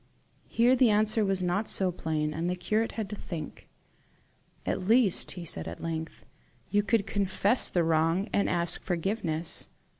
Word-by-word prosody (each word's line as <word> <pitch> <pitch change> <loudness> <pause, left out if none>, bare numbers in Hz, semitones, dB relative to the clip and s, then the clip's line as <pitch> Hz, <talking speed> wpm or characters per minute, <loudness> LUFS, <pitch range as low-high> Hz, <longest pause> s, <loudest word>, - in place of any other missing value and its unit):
Here 240 +3 +3
the 250 -2 +4
answer 215 +1 +2
was 195 -2 0
not 180 +5 -1
so 190 -2 +1
plain, 155 -3 -2
and 165 +3 -2
the 180 - -1
curate 215 +5 -1
had 220 -3 -3
to - - -3
think. 170 -5 -7 1.0
"At 185 - -2
least," 225 -4 +3
he 175 -2 -7
said 80 - -2
at 85 - -7
length, 160 -1 -5 0.5
"you 205 - +3
could 210 -1 +1
confess 200 +3 +1
the 175 - +1
wrong, 165 +4 +1
and 200 - +2
ask 170 -1 +2
forgiveness." 170 -3 -2
185 Hz, 160 wpm, -28 LUFS, 165-210 Hz, 1.0 s, the